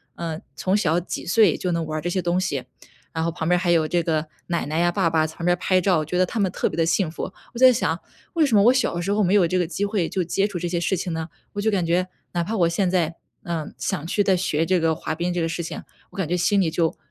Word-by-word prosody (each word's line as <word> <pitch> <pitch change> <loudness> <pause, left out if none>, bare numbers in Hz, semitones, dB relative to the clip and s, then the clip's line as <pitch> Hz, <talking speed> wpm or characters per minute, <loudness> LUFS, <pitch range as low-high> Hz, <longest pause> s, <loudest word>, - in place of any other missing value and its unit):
呃， 165 -1 -4 0.2
从 190 +7 0
小 170 -3 +2
几 - - -5
岁 200 -2 +4
就 180 - -2
能 165 -1 -1
玩 155 0 -3
儿 - - -6
这 175 - -2
些 185 +1 0
东 175 +1 +1
西。 185 - -2 0.5
然 160 0 -1
后 170 - 0
旁 160 -1 -4
边 180 0 +3
还 175 -1 -1
有 160 -2 +3
这 175 +1 +1
个 160 -1 0 0.2
奶 170 -4 -1
奶 155 +3 -1
呀、 175 0 +3
爸 190 -2 +1
爸 160 -1 +2
在 160 - -11
旁 170 - -5
边 175 - +4
儿 - - -19
拍 185 -1 +3
照， 180 -3 +2
我 155 - -2
觉 180 +4 -2
得 185 - +4
他 220 - -4
们 190 -3 +1
特 - - 0
别 - - -4
地 165 - +2
幸 165 0 +1
福。 185 - -5 0.2
我 235 - -6
在 260 0 +8
想， 240 - 0 0.3
为 330 -2 +3
什 255 -7 +2
么 200 - +6
我 245 +3 +6
小 260 -9 +1
的 175 - -2
时 200 - -1
候 210 0 +2
没 190 +3 +3
有 180 -4 +5
这 185 +2 0
个 175 - 0
机 200 +3 -2
会 200 -5 -1
就 185 - -1
接 195 +4 0
触 195 -4 -5
这 175 0 -2
些 170 0 -1
事 180 +2 0
情 175 -1 -3
呢？ 160 0 -4 0.2
我 205 - -3
就 220 - +2
感 190 -5 +1
觉， 180 +2 +1 0.2
哪 175 -1 0
怕 220 +5 -3
我 170 -2 +4
现 180 +2 +1
在， 170 -3 0 0.3
呃， 165 -3 -3
想 155 +3 -3
去 205 +3 +1
再 190 -1 +3
学 165 -3 0
这 185 0 +2
个 160 -1 +1
滑 - - -4
冰 175 +2 -2
这 175 -1 -1
个 165 - +1
事 165 +1 -3
情， 165 - -6 0.3
我 - - -15
感 190 -5 -1
觉 175 - 0
心 195 +3 +2
里 165 -4 +2
就 165 -1 0
175 Hz, 335 characters per minute, -23 LUFS, 165-190 Hz, 0.5 s, 在